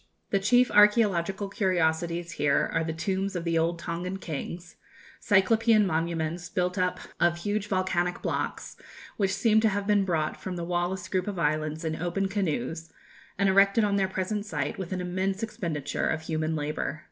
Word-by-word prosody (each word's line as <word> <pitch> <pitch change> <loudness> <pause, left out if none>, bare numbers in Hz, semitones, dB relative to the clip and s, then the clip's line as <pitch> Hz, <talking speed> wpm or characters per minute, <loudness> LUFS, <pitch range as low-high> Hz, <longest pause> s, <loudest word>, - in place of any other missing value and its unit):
The 195 - +3
chief 245 +6 +4
archæological 205 -2 +3
curiosities 170 -3 0
here 145 -4 +1
are 165 - +1
the 160 - -2
tombs 190 +4 -2
of 175 - -2
the 165 -1 +1
old 170 +1 0
Tongan 175 +3 -4
kings, 170 +1 -6 0.4
cyclopean 215 +2 +4
monuments 165 0 -2
built 180 0 -1
up 180 -2 0 0.2
of 175 0 +3
huge 205 +3 -2
volcanic 185 -2 0
blocks, - - -3 0.4
which 195 -2 +1
seem 220 +1 +4
to 220 - +4
have 200 0 -2
been 205 -1 +3
brought 160 -5 -1
from 185 - -4
the 170 -1 -4
Wallis 175 +1 -2
group 185 0 -1
of 200 -2 -3
islands 155 0 -1
in 160 0 -1
open 185 +4 -1
canoes, 165 - -2 0.5
and 200 0 +2
erected 195 +3 +4
on 205 -1 +2
their 195 -1 +2
present 190 +2 -2
site 150 -7 -3
with 190 -1 -5
an 185 -1 -2
immense 190 +3 -2
expenditure 170 -9 -2
of 160 - -1
human 160 0 -1
labour. 150 0 -3
180 Hz, 170 wpm, -27 LUFS, 165-195 Hz, 0.5 s, chief